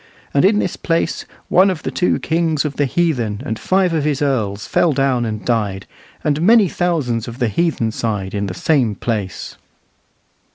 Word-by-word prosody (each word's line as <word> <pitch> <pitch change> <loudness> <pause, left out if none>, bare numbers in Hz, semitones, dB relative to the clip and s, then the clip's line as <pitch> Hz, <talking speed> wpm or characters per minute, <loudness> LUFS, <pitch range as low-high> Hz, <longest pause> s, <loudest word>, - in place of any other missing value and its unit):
And 140 - +3
in 205 +2 +4
this 185 - -1
place 165 -1 -1 0.2
one 190 +2 +5
of 180 -4 -4
the - - -3
two 180 - +1
kings 160 -2 0
of 145 - -4
the 145 - +2
heathen 125 -9 -1
and 110 -5 -3
five 185 -2 +1
of 155 -3 0
his 145 -2 0
earls 110 -8 -1
fell 165 -3 +2
down 130 -3 +1
and 110 -1 -4
died, 105 -5 -1 0.4
and 150 0 0
many 215 +2 +5
thousands 145 -11 -1
of 120 0 -7
the 120 -4 0
heathen 120 - 0
side 105 -4 -3
in 100 -1 -2
the 90 - -5
same 125 - +1
place." 105 -3 -4
135 Hz, 180 wpm, -18 LUFS, 110-165 Hz, 0.4 s, one